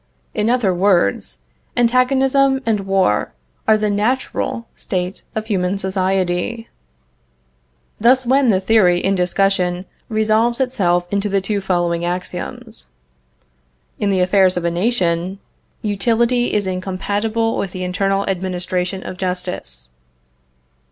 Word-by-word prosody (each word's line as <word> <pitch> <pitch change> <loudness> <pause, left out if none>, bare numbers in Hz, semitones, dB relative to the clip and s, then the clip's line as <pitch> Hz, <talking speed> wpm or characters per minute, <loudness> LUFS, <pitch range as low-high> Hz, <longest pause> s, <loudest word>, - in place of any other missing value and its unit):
In 215 +1 0
other 240 -6 +2
words, 175 - +1 0.4
antagonism 265 +3 +3
and 220 -2 +1
war 190 - +1 0.3
are 220 - +5
the 210 -1 0
natural 230 +2 -1
state 185 -1 -3
of 220 0 -2
human 190 -3 0
society. 190 +3 -1 1.3
Thus 255 +4 +4
then 260 +1 +3
the 190 -3 +3
theory 190 -4 +3
in 195 +2 +1
discussion 180 0 +1 0.2
resolves 220 +2 +2
itself 180 -9 +1
into 200 +1 0
the 195 0 +2
two 200 +1 -2
following 175 -2 0
axioms. 175 - -5 1.1
In 205 - +1
the 190 -2 +2
affairs 185 0 +3
of 175 - -2
a 170 - +1
nation, 180 -2 0 0.5
Utility 235 +4 +1
is 205 -1 0
incompatible 200 +5 -1
with 195 - -2
the 185 0 -5
internal 195 +2 0
administration 185 0 -2
of 185 - -7
justice. 180 - -4
195 Hz, 120 wpm, -19 LUFS, 180-225 Hz, 1.3 s, are